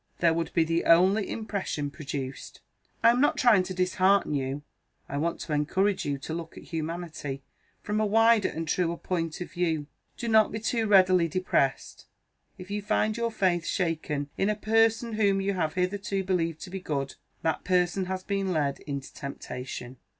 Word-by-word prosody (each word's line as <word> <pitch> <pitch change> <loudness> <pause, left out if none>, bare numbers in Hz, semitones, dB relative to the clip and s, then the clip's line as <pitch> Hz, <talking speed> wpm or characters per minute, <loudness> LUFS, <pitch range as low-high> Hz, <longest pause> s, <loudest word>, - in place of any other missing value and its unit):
There 165 -2 +3
would 165 0 -2
be 165 - +5
the 165 +1 0
only 190 +5 +4
impression 195 -9 -3
produced. 140 -3 -6 0.4
I 230 - +8
am 245 +2 +1
not 290 - +3
trying 235 -6 +5
to 185 - -5
dishearten 185 0 +2
you; 140 +1 -2 0.4
I 140 - -4
want 165 +3 -1
to 155 - -4
encourage 185 +7 +1
you 140 -1 -1
to 150 +3 -6
look 165 -1 -6
at - - -9
humanity 160 -4 -5 0.4
from 210 +1 -1
a - - +2
wider 225 0 +4
and 165 0 -5
truer 170 +1 0
point 165 -2 -3
of 180 - -6
view. 165 -4 -1 0.3
Do 235 - -4
not 220 -1 +5
be 220 - -3
too 225 0 0
readily 185 -4 +5
depressed, 160 -6 -1 0.5
if 180 +2 -10
you 205 0 -2
find 215 +1 +1
your 235 0 -1
faith 180 -5 +1
shaken 155 -5 -2
in 195 - +2
a 210 - +1
person 225 +2 +2
whom 200 -2 +2
you 195 +1 0
have 160 -5 -1
hitherto 195 +1 -1
believed 165 -4 -1
to 185 - -8
be 190 - -4
good. 140 -6 -3 0.3
That 160 - 0
person 180 +1 +1
has 185 0 -4
been 195 -1 -1
led 145 -4 0
into 140 -2 -6
temptation. 125 -2 -7
180 Hz, 180 wpm, -27 LUFS, 155-200 Hz, 0.5 s, I